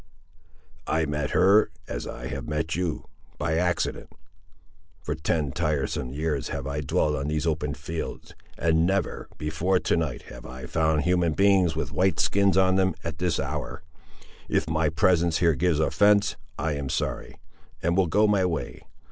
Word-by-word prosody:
"I 80 0 +1
met 75 -1 -2
her, 100 +4 +5 0.2
as - - -5
I - - -7
have - - -5
met 75 +1 -2
you, 85 -3 -2 0.3
by 80 - 0
accident. 90 -1 -1 0.9
For 75 - -2
ten 75 -2 -1
tiresome 75 -5 -1
years 75 0 -2
have 70 -1 -4
I 70 +2 -3
dwelt 75 +2 +1
on 70 0 -3
these 75 +1 -1
open 75 -3 -1
fields, 80 +4 -6 0.2
and 80 0 +2
never, 95 -3 -1
before 80 +5 0
to - - +1
night, 80 -7 -2
have - - -11
I 65 +1 -8
found 80 +2 +1
human 90 -2 +2
beings 95 -3 +3
with 80 -2 -2
white 95 0 +2
skins 100 -1 +3
on 95 0 +4
them, 95 0 +2
at 80 -1 -5
this 90 -2 0
hour. - - -4 0.7
If 80 - +1
my 80 -1 +1
presence 85 -1 +2
here 85 -2 +3
gives 80 +2 +1
offence, 100 +5 +3 0.2
I 75 +2 -1
am 70 -2 -4
sorry; - - -3 0.5
and 85 +1 +1
will 95 -1 +3
go 105 +7 +3
my 105 -3 +3
way. 85 -4 -3
80 Hz, 165 wpm, -26 LUFS, 75-90 Hz, 0.9 s, her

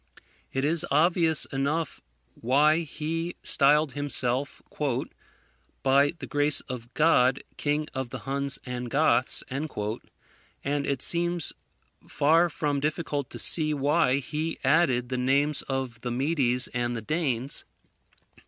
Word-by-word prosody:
It 135 +1 -1
is 160 +2 +4
obvious 160 0 +5
enough 140 +3 -2 0.3
why 150 +6 +2
he 165 +2 -4
styled 145 +1 +3
himself 135 -1 0 1.2
"By 140 +2 +3
the - - -7
grace 145 0 +4
of 120 -2 -8
God, 135 -5 +3
King 150 +1 -2
of 130 -2 -4
the - - -6
Huns 140 +1 -3
and 125 -1 -5
Goths;" 140 -2 +2
and 140 +2 -6
it 140 -3 -2
seems 175 -1 +1 0.5
far 165 +4 +2
from 145 -2 -2
difficult 150 -2 -3
to - - -9
see 155 -2 +3
why 145 -1 +2
he 155 +4 -4
added 130 -4 +2
the 130 - -2
names 140 +4 +2
of 130 -4 -4
the 125 - -4
Medes 125 -1 0
and 120 0 -3
the 115 - -6
Danes. 135 -3 -2
140 Hz, 125 wpm, -26 LUFS, 130-155 Hz, 1.2 s, obvious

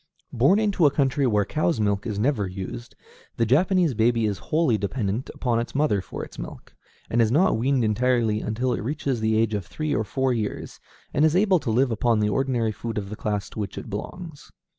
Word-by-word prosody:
Born 140 - +4
into 205 -7 +3
a - - +5
country 140 -1 +1
where 105 -3 +2
cow's 155 - 0
milk 100 +1 0
is 105 -3 -3
never 110 -3 +1
used, 90 -10 -7 0.4
the 115 - +2
Japanese 170 - +3
baby 115 0 +2
is 100 -4 -1
wholly 155 -7 +3
dependent 105 +2 -2
upon 120 -3 -1
its 120 - -5
mother 135 -9 +2
for - - -7
milk, - - -9 0.4
and 120 - +3
is 110 -1 +2
not 170 +9 +3
weaned 130 +2 +1
entirely 110 -1 +1
until 125 +4 -1
it - - -3
reaches 135 -1 -2
the 110 0 +1
age 110 -1 +1
of 100 -4 -3
three 155 -1 -3
or 110 - +1
four 130 +5 0
years, 110 -3 -4 0.3
and 145 - +2
is 160 +1 +4
able 190 -1 +4
to 135 - -4
live 125 +3 +2
upon 115 0 +1
the 105 0 +1
ordinary 120 -1 0
food 115 +1 -5
of 100 -1 -4
the - - -4
class 105 -1 -2
to - - -7
which 100 -3 -4
it - - -7
belongs. 160 - -7
120 Hz, 210 wpm, -24 LUFS, 105-140 Hz, 0.4 s, a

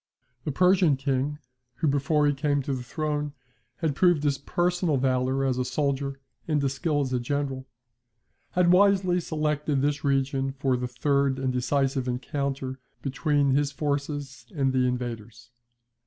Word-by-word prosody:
The 150 - -1
Persian 180 -2 +4
King 140 +1 -1 0.4
(who 160 - -1
before 145 +2 +2
he 145 - +3
came 145 0 0
to 140 - -2
the 130 - -3
throne, 150 +2 -3 0.4
had 155 0 -1
proved 175 -2 +3
his 140 -2 +1
personal 175 0 0
valour 130 +1 +1
as 130 -1 0
a - - +1
soldier, 140 0 -1 0.3
and 155 -2 +1
his 140 -1 0
skill 150 0 0
as 130 -2 -2
a 125 - +1
general) 135 +1 -3 0.9
had 180 -1 +4
wisely 190 -1 +4
selected 150 -3 -1
this 145 0 0
region 135 -1 0
for 135 -1 0
the 125 0 -2
third 140 +1 +1
and 130 -1 -1
decisive 135 +1 0
encounter 135 +1 -3 0.2
between 140 +1 +1
his 140 +1 +2
forces 140 -4 -3
and 135 -3 +1
the 130 -1 +2
invaders. 120 -2 -5
140 Hz, 155 wpm, -26 LUFS, 130-150 Hz, 0.9 s, Persian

